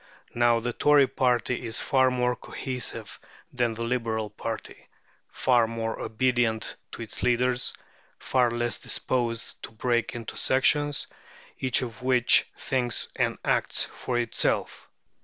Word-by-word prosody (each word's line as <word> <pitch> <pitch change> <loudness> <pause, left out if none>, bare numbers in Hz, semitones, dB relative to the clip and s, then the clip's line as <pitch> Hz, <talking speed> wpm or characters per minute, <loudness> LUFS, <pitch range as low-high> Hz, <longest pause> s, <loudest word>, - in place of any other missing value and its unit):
Now, 120 -1 +3
the 120 +1 -3
Tory 145 +1 +5
party 125 -1 0
is 115 +2 -2
far 130 -2 +3
more 125 -1 0
cohesive 130 -1 -4 0.3
than 120 -3 0
the 115 - -4
Liberal 115 -3 -2
party, 110 +1 -7 0.4
far 120 -3 +2
more 115 0 -4
obedient 120 -1 0 0.2
to - - -6
its 110 - -9
leaders, 125 0 +2 0.4
far 125 -2 +2
less 120 0 -2
disposed 115 -3 -2
to - - -7
break 120 +1 -1
into 115 -2 -7
sections, 145 +2 +2 0.5
each 130 -1 +2
of 120 0 -7
which 125 -1 +4
thinks 125 -3 +1
and - - 0
acts - - +1
for 125 - -4
itself. 120 -1 0
120 Hz, 130 wpm, -26 LUFS, 115-125 Hz, 0.5 s, Tory